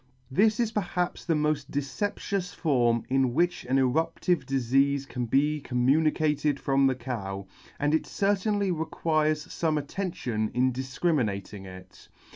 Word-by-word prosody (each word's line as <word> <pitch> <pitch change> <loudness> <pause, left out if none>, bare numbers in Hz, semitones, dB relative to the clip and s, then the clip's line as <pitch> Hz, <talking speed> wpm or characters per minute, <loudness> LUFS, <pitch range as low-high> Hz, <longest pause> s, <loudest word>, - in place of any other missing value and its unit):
This 215 - +3
is 230 -2 +1
perhaps 180 -4 -2
the 165 - +2
moil 150 0 +2
deceptious 180 +6 -3
form 120 -7 +2
in 130 -2 +1
which 175 +2 +1
an 130 +2 +1
erup 135 +5 +1
tive 180 -2 +1
difeafe 135 +1 +1
can 125 -3 -3
be 150 +5 +2
communicated 150 +3 +1
from 135 0 +3
the 130 - +1
cow, 100 -6 -5 0.3
and 145 +1 +1
it 160 - +1
certainly 200 0 +1
requires 155 -2 0
fome 160 -2 -1
attention 145 - -2
in 130 +1 +2
difcriminating 125 - -2
it. 95 0 -13
145 Hz, 135 wpm, -27 LUFS, 125-165 Hz, 0.3 s, This